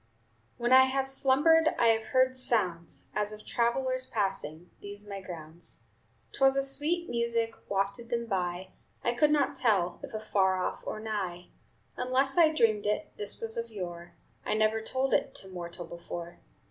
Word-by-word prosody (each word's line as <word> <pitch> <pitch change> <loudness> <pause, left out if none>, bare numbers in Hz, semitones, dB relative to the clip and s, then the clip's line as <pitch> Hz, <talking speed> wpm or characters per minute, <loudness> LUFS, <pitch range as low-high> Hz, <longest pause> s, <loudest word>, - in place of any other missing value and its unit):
"When 240 +1 +2
I 260 0 +9
have 265 0 -1
slumbered 295 +5 +4
I 235 - +4
have 225 -1 +2
heard 260 0 +2
sounds 185 -10 -1
As 210 0 -1
of 215 0 -10
travelers 255 +2 0
passing 185 -5 -3
These 205 +1 -7
my 200 -1 -6
grounds. 165 -6 -10 0.5
"'T - - -8
was 270 0 +5
a 275 - +2
sweet 310 +6 0
music 235 -1 0 0.2
Wafted 200 +4 -1
them 235 -1 -1
by, 185 -3 -2 0.3
I 240 - +1
could 295 +5 +3
not 290 -1 +2
tell 200 -9 +1
If - - -8
afar 195 -3 +1
off 185 - -2
or - - -3
nigh. 195 -5 -4 0.5
"Unless 260 +2 +1
I 330 -2 +6
dreamed 220 -8 +2
it 210 - -1
This 205 -1 -1
was 225 0 -2
of 230 0 -3
yore; 175 -5 -7 0.3
I - - -1
never 215 +1 +2
told 260 +4 -1
it - - +1
To 190 - -3
mortal 175 -1 -7
before. 170 0 -8
220 Hz, 170 wpm, -29 LUFS, 190-260 Hz, 0.5 s, I